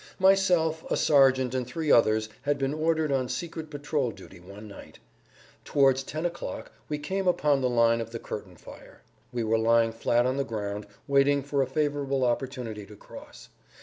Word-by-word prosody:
Myself, 180 -4 +3
a - - +1
sergeant, 130 -3 +4
and 130 -2 -2
three 155 +3 -2
others 110 -1 +4
had 145 0 0
been 135 0 -1
ordered 155 -1 0
on 130 -2 0
secret 160 -2 -5
patrol 145 -3 -2
duty 95 - -12
one 100 +4 -12
night. 100 - -12 0.7
Towards 135 -2 +3
ten 155 +5 -5
o'clock 175 0 -5 0.2
we 150 - -2
came 190 +6 -3
upon 150 -6 +2
the 130 - +1
line 115 -1 +3
of 115 - -6
the 115 - -6
curtain 105 -5 -8
fire. - - -14 0.3
We 120 -2 -2
were 110 0 +1
lying 115 0 +3
flat 120 +1 +1
on 130 +1 0
the 140 - +1
ground, 105 -3 -5 0.2
waiting 140 0 +3
for 140 0 -1
a 135 - 0
favorable 140 -1 -1
opportunity 120 -4 -3
to 105 - -13
cross. - - -13
135 Hz, 180 wpm, -27 LUFS, 115-150 Hz, 0.7 s, sergeant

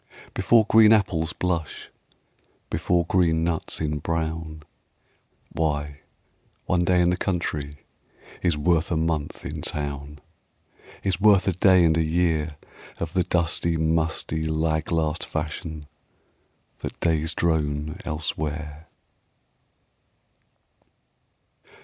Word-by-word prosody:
Before 110 +3 +4
green 110 0 +7
apples 90 -7 +1
blush, 85 -4 -3 0.8
Before 85 +1 +1
green 85 -2 +2
nuts 85 -1 -1
embrown, 80 +1 -3 0.9
Why, 75 -2 -2 0.7
one 90 -1 +1
day 90 0 +3
in 90 0 +3
the 90 - 0
country 75 -7 -3 0.6
Is 85 -4 +1
worth 80 +1 +2
a 85 - 0
month 80 -2 -2
in - - -5
town; 70 0 -5 0.9
Is 95 -2 -1
worth 100 -2 +5
a - - +4
day 90 0 +5
and 80 -1 +3
a 80 - +3
year 80 -2 0 0.4
Of 85 0 -4
the 95 - +2
dusty, 85 -1 0
musty, 80 0 0
lag 80 0 -1
last 80 -1 0
fashion 80 0 -5 0.9
That - - -7
days 80 -1 0
drone 75 0 -1
elsewhere. 75 -1 -4
80 Hz, 105 wpm, -24 LUFS, 75-85 Hz, 0.9 s, green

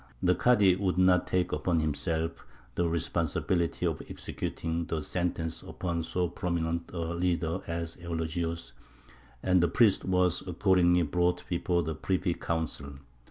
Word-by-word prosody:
The 90 - +5
Kādy 95 -2 +4
would 95 -3 0
not 90 -1 +4
take 90 -1 +1
upon 80 +2 +1
himself 80 +2 -1 0.3
the 85 +5 +1
responsibility 85 +1 0
of - - -1
executing 85 +1 -3
the 80 -2 -2
sentence 85 -1 -2
upon 85 -2 -3
so 90 +2 -1
prominent 85 -1 -2
a 85 -1 -3
leader 85 0 0
as 85 0 -4
Eulogius, 85 -4 -3 0.7
and 90 -1 +4
the 85 - +4
priest 100 +4 +4
was 90 -2 +2
accordingly 90 -1 +3
brought 90 +3 0
before 85 0 +1
the 80 0 -2
privy 90 +2 0
council. 80 -4 -3
85 Hz, 135 wpm, -29 LUFS, 80-90 Hz, 0.7 s, The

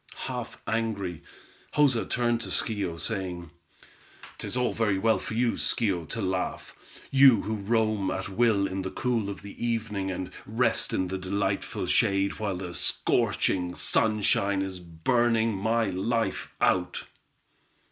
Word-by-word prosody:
Half - - -5
angry, 105 -7 -2 0.5
Joza 140 -6 +3
turned 120 -1 +1
to - - -5
Schio, 95 -7 0
saying: 90 -6 -3 0.9
"'Tis - - -3
all 125 -1 +1
very 105 -4 +1
well 110 +3 +2
for 110 - -6
you, 120 0 +2
Schio, 95 -8 0
to 115 - -3
laugh; 95 -1 -3 0.4
you 135 -5 +7
who 110 +2 -2
roam 110 -1 +1
at 95 - -3
will 100 0 +2
in 95 0 -3
the 95 - -3
cool 115 +1 -1
of 100 - -7
the 100 +3 -8
evening, 110 -4 -1
and 90 0 -4 0.2
rest 115 +2 +1
in 95 -1 -1
the 95 0 -3
delightful 95 +1 -2
shade, 100 +1 +2
while 100 -4 -2
the 90 -1 -6
scorching 90 0 +1
sunshine 100 -2 +2
is 95 -1 -5
burning 115 +7 +1
my 110 +4 +1
life 105 +5 -1
out." 90 -1 +1
100 Hz, 140 wpm, -27 LUFS, 95-115 Hz, 0.9 s, you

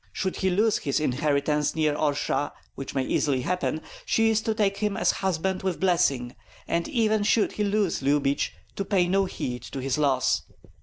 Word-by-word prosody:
Should 190 -2 -2
he 190 - +1
lose 210 +4 +2
his 140 - 0
inheritance 150 +1 0
near 155 -2 +2
Orsha, 145 -1 0 0.2
which 135 - -7
may 135 - +1
easily 135 -2 +1
happen, 170 0 -1 0.2
she 225 0 +2
is 220 0 +2
to 220 0 -1
take 200 -3 +1
him 210 -2 -1
as - - +3
husband 190 0 -1
with 190 -2 -2
blessing; 170 -10 +1 0.3
and 170 0 0
even 220 -5 +1
should 210 +1 +2
he 210 - -2
lose 205 -5 0
Lyubich, 140 0 +1 0.3
to 195 - 0
pay 190 -3 +2
no 195 +2 +2
heed 125 -8 -4
to 135 - -7
the 135 +3 -1
loss. 135 -3 +2
175 Hz, 185 wpm, -26 LUFS, 145-200 Hz, 0.3 s, as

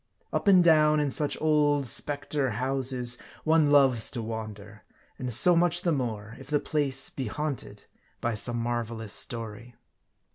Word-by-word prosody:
Up - - -2
and 185 -3 +6
down 155 -2 +4
in 145 -2 -1
such 145 +2 -1
old 150 -2 +1
specter 145 +2 -2
houses 125 0 -2 0.2
one 155 -2 +3
loves 135 -6 +3
to 120 - -5
wander; 110 -2 -8 0.4
and 125 -1 -4
so 170 +10 +6
much 175 0 +2
the 170 - +1
more, 115 -6 -4
if 135 - -13
the 145 0 0
place 140 -4 -1
be 130 -3 -5
haunted 130 -6 -5 0.4
by 120 - -2
some 120 +3 +4
marvelous 115 -2 -4
story. 115 +1 -4
130 Hz, 150 wpm, -26 LUFS, 115-150 Hz, 0.4 s, and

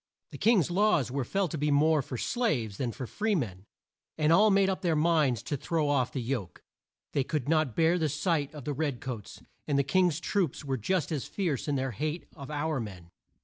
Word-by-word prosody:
The - - -9
King's 205 - +3
laws 185 - +2
were 135 0 -1
felt 195 +4 -1
to 155 - -3
be 150 +1 +1
more 150 +1 +4
for 125 -1 -6
slaves 125 - -1
than 125 -3 -1
for 130 - -6
free 210 - -1
men, 100 - -3 0.5
and 155 +1 +3
all 210 +5 +6
made 195 -1 +4
up 190 -1 -1
their 170 -3 +1
minds 150 -7 +2
to 145 - -2
throw 155 +2 -1
off 130 -4 +1
the 125 - -3
yoke. 115 -7 -4 0.5
They 140 - +2
could 145 -2 -2
not 155 -6 +1
bear 165 +2 +3
the 155 -2 +1
sight 145 0 0
of 145 - -8
the 145 - -1
red 140 -3 -2
coats; 120 -6 -7 0.2
and 145 - +1
the 140 - +3
King's 170 +2 +2
troops 175 -6 -1
were 135 -1 -1
just 165 - -1
as 150 -5 -2
fierce 165 - -2
in 145 - 0
their 135 -1 -1
hate 155 - -3
of 140 -1 -9
our 150 0 -1
men. 95 -6 -8
150 Hz, 220 wpm, -29 LUFS, 130-170 Hz, 0.5 s, all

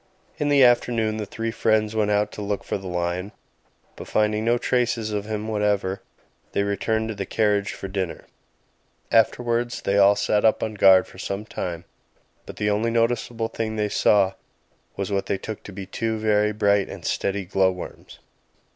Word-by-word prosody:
In 145 -1 0
the 140 -2 +5
afternoon 120 -3 +3
the 105 -2 -4
three 115 +3 -3
friends 110 -1 +1
went 105 -1 +1
out 105 0 +1
to - - -7
look 100 0 -2
for - - -3
the 95 -1 -5
lion, 90 +2 -2 0.6
but, - - -9
finding 105 0 +1
no 120 +1 +2
traces 120 -3 0
of 105 -1 -2
him 110 0 -4
whatever, 105 -3 0 0.5
they 100 - +1
returned 110 +2 -1
to - - -2
the 100 -2 -5
carriage 105 -2 +1
for 95 - -7
dinner. 95 -3 -4 0.9
Afterwards 120 +1 +1
they 100 +1 +2
all 100 +1 +6
sat 105 0 +1
up 110 - +3
on 110 - -2
guard 95 -2 +6
for 95 - -15
some 100 +2 -4
time; 85 -5 -5 0.6
but - - -8
the 105 0 0
only 110 +3 +1
noticeable 115 0 0
thing 110 -1 -4
they 105 -1 0
saw 100 -2 +3 0.6
was 100 +1 -3
what 100 -1 -1
they 100 - 0
took 110 +2 -7
to - - -10
be 95 0 -7
two 110 +3 -2
very 105 -1 +2
bright 100 -1 +2
and - - -9
steady 100 -1 -1
glow 95 +1 +2
worms. 90 -1 -9
105 Hz, 180 wpm, -24 LUFS, 100-110 Hz, 0.9 s, all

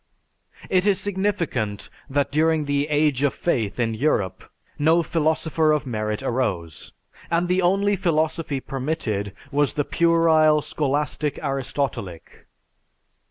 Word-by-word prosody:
It 185 +1 +2
is 200 -2 +3
significant 180 - -2 0.2
that 140 0 0
during 155 +1 +2
the 145 0 0
"age 150 -3 +2
of 145 -1 +1
faith" 120 - -1
in 115 -2 +1
Europe 105 - 0 0.4
no 160 +3 +4
philosopher 160 0 +1
of 150 -2 +1
merit 110 -3 -3
arose, 90 - -2 0.4
and 170 +1 +1
the 180 +1 +2
only 195 +3 +2
philosophy 160 -4 0
permitted 130 -8 -3 0.2
was 145 -1 +1
the 145 - 0
puerile 160 -3 +3
Scholastic 145 0 -1
Aristotelic. 135 - -4
150 Hz, 115 wpm, -23 LUFS, 130-165 Hz, 0.4 s, no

